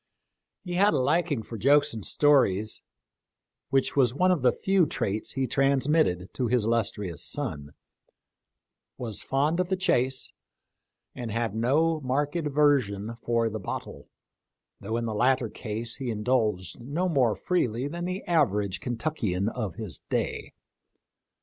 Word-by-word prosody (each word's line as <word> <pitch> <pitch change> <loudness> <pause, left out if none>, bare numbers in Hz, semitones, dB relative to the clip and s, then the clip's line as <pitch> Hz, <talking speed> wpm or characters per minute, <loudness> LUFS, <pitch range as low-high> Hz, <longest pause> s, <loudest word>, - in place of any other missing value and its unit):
He 180 - -5
had 195 -1 +4
a - - +3
liking 145 -1 +1
for 115 -1 -8
jokes 145 +5 +4
and 110 -3 -6
stories, 110 -9 +2 0.9
which 135 -1 +1
was 130 -3 +3
one 185 +4 +3
of 175 -6 +1
the 125 - +5
few 190 -4 +2
traits 105 -3 -2
he 135 -1 0
trans 135 0 +2
mitted 95 - +1
to 125 - -1
his 120 -2 +1
illustrious 105 -7 -1
son; 80 - -4 1.2
was 115 -5 -5
fond 145 +5 0
of 180 -1 0
the 190 - +2
chase, 130 -8 0 0.8
and 120 -2 -6
had 115 -1 -1
no 150 +8 +2
marked 145 +4 -1
aversion 140 - +1
for 115 -1 +1
the 110 0 -4
bottle, 95 - -6 0.7
though 110 +3 -3
in 120 - -2
the 110 - -2
latter 125 +2 +2
case 115 +2 -4
he 130 -2 -4
indulged 105 -4 0
no 145 +10 -2
more 130 -10 +2
freely 130 -8 -1
than 170 +4 -5
the 185 +2 -3
average 105 - +1
Kentuckian 115 - -2
of 110 -8 -4
his 100 - -4
day. - - -2
125 Hz, 145 wpm, -27 LUFS, 110-145 Hz, 1.2 s, the